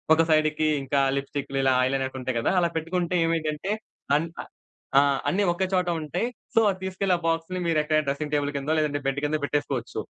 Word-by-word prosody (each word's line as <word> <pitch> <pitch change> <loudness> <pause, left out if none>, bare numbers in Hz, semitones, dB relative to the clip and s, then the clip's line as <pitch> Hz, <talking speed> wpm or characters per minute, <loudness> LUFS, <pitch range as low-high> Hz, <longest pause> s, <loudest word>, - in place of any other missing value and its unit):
ఒక 165 - +4
సైడ్‌కి 155 0 +3 0.2
ఇంకా 140 +1 +1 0.2
లిప్‌స్టికులు, 140 0 -3 0.2
ఐ - - +2
లైనర్స్ 130 0 -2
ఉంటాయి 130 -2 -2
గదా! 115 - +1
అలా 170 - +2
పెట్టుకుంటే 175 +2 -1
ఏమవుతుందంటే, 165 +3 -1 0.5
అన్ 165 - -2 0.2
అ - - -14 0.5
ఆ! - - +7 0.3
అన్నీ 200 +2 +1
ఒక 190 - -2
చోట 180 -1 +2
ఉంటాయి. 170 +9 -2 0.3
సో, 225 - +5
అది 185 -1 -2
తీసుకెళ్లి 190 0 0
ఆ - - -9
బాక్స్‌ని 165 +2 -1
మీరు 160 -2 +2
ఎక్కడైనా 155 0 +1
డ్రెసింగ్ 150 +2 -2
టేబుల్ 145 -1 +1
కిందో, 140 +3 -1
లేదంటే 145 -1 0
బెడ్ 135 +1 0
కిందో 150 +1 0
పెట్టేసుకోవచ్చు. 140 -4 -2
155 Hz, 190 wpm, -26 LUFS, 140-175 Hz, 0.5 s, ఆ